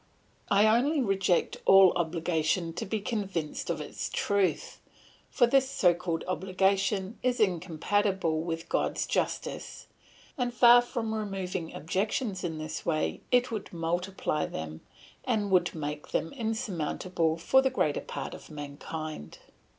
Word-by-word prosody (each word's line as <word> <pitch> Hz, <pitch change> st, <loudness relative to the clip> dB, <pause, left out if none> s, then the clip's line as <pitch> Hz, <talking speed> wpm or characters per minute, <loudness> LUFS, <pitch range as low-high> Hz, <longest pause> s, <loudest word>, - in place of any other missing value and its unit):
I 200 Hz, +1 st, +5 dB
only 250 Hz, +8 st, +3 dB
reject 195 Hz, -6 st, +1 dB
all 195 Hz, -2 st, +7 dB
obligation 165 Hz, 0 st, 0 dB
to -, -, -5 dB
be 220 Hz, +2 st, -1 dB
convinced 195 Hz, -8 st, -3 dB
of -, -, -1 dB
its -, -, -5 dB
truth; 195 Hz, -6 st, 0 dB, 0.5 s
for 245 Hz, -, +4 dB
this 265 Hz, +2 st, +3 dB
so 180 Hz, -9 st, +4 dB
called 170 Hz, -1 st, -3 dB
obligation 190 Hz, +3 st, 0 dB
is 250 Hz, -1 st, 0 dB
incompatible 185 Hz, -1 st, +1 dB
with 165 Hz, 0 st, -4 dB
God's -, -, 0 dB
justice, -, -, -3 dB, 0.5 s
and 245 Hz, -1 st, 0 dB
far 240 Hz, +1 st, +8 dB
from 235 Hz, -2 st, -3 dB
removing 190 Hz, -5 st, -3 dB
objections 195 Hz, -, -2 dB
in 165 Hz, -3 st, -3 dB
this 155 Hz, 0 st, -5 dB
way 155 Hz, -2 st, -1 dB
it 250 Hz, 0 st, +3 dB
would 215 Hz, -3 st, -5 dB
multiply 170 Hz, -1 st, -2 dB
them, 80 Hz, 0 st, -6 dB, 0.4 s
and 210 Hz, -5 st, 0 dB
would 180 Hz, -2 st, +3 dB
make 150 Hz, -1 st, -5 dB
them 165 Hz, -, -2 dB
insurmountable 185 Hz, -, -1 dB
for 265 Hz, +10 st, +4 dB
the 265 Hz, -, +2 dB
greater 150 Hz, -, 0 dB
part -, -, -6 dB
of -, -, -11 dB
mankind. 150 Hz, -, -7 dB
185 Hz, 135 wpm, -29 LUFS, 165-215 Hz, 0.5 s, far